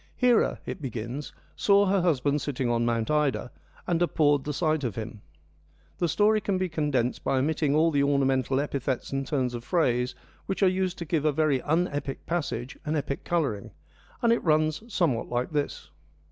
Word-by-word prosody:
Hera, 245 -2 +3
it - - -6
begins, 125 +2 -5 0.2
saw 200 0 +4
her 195 -1 +2
husband 145 -4 +1
sitting 130 -3 -2
on 120 0 +1
Mount 115 +2 0
Ida, 150 -5 0 0.3
and 175 -1 0
abhorred 145 -5 +2
the 150 - -2
sight 155 0 0
of 120 -6 -2
him. 110 -1 -6 0.8
The 175 - +2
story 215 +6 +3
can 200 -2 0
be 185 0 -1
condensed 145 -6 -1
by 135 - +1
omitting 145 +1 +1
all 165 +2 +4
the 145 -2 +2
ornamental 135 -2 +2
epithets 140 -3 -2
and 135 -1 -2
turns 130 -4 0
of 120 -1 -5
phrase 125 -6 +1 0.3
which 195 +1 -1
are - - +6
used 185 0 0
to 170 - -5
give 160 -2 0
a 155 - +3
very 145 -3 +1
un 165 +4 +1
epic 145 -1 -5
passage 145 -6 -3
an 155 +1 -1
epic 140 -2 -3
colouring, 140 -13 -1 0.5
and 235 0 +5
it 235 - -1
runs 155 0 +2
somewhat 165 - 0
like 125 +3 -1
this. 145 - -3
145 Hz, 185 wpm, -27 LUFS, 130-170 Hz, 0.8 s, are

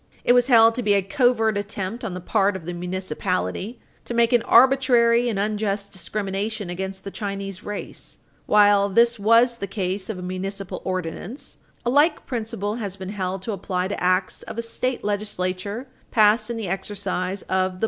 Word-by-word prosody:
It 245 - +5
was 245 0 +4
held 230 -3 +6
to 250 - -2
be 205 -3 +3
a 200 - +2
covert 225 -1 +2
attempt 205 +3 -5
on 195 -5 -4
the - - -4
part 200 +2 +1
of 180 -4 -7
the 175 - -4
municipality 180 - -3 0.3
to 240 - -4
make 235 0 +3
an 240 - +5
arbitrary 245 -2 +5
and 215 - -2
unjust 205 -1 -1
discrimination 200 +1 -3
against 190 +1 -5
the 195 - -6
Chinese 200 -2 -5
race. 210 -1 -7 0.3
While 205 -1 +5
this 235 +3 +3
was 230 +3 +4
the 200 - -3
case 190 0 -3
of 215 - -3
a 180 - -7
municipal 190 +1 -5
ordinance, 185 - -5 0.3
a 240 - +2
like 295 +5 +3
principle 225 -3 -3
has 200 -5 -4
been 190 -1 -7
held 190 -2 -3
to 225 - -3
apply 185 -2 -2
to 200 - -4
acts 185 +1 +1
of - - -9
a 230 - -2
state 255 +2 -3
legislature 205 +2 -3 0.2
passed 215 0 +4
in 235 - -3
the 220 -3 -4
exercise 190 0 -3
of - - -25
the - - 0
police 185 0 +1
power. 185 - -13
205 Hz, 190 wpm, -23 LUFS, 190-230 Hz, 0.3 s, held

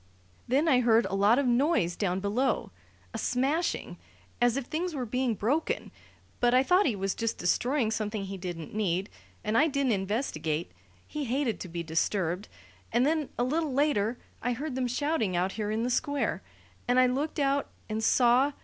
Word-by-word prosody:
Then 280 +6 +2
I 265 -5 +5
heard 235 -1 +4
a - - -4
lot 200 +4 +4
of 280 - +2
noise 245 - +2
down 190 -1 -1
below 230 +5 0 0.4
a - - -3
smashing 285 +8 -1 0.4
as 245 +1 +3
if 275 - -2
things 335 +4 -3
were 255 -3 -2
being 250 0 0
broken. 275 +11 -1 0.5
But 245 0 +3
I 255 - +5
thought 365 +7 +4
he 235 - 0
was 195 0 -1
just 230 -1 -2
destroying 235 +6 +1
something 215 -2 -2
he 195 0 -5
didn't 175 -4 -6
need, 195 -2 -1 0.3
and 215 - -1
I 295 +7 +5
didn't 280 -4 +1
investigate: 195 - -1 0.4
he 300 -1 -4
hated 255 -1 -1
to - - -6
be 170 0 -4
disturbed. 175 +3 -1 0.4
And 240 +2 +3
then, 310 -1 +1
a 245 - +1
little 300 +2 0
later, 250 -5 +1 0.2
I 245 - 0
heard 280 +4 -4
them 255 -1 -1
shouting 250 - 0
out 180 +2 +1
here 210 0 -3
in 220 +2 -1
the 250 - 0
Square, 280 -2 0 0.5
and 245 +1 +4
I 255 - +6
looked 275 +5 -1
out 280 -1 +1 0.2
and 220 0 -3
saw. 250 +5 +4
245 Hz, 185 wpm, -29 LUFS, 205-275 Hz, 0.5 s, I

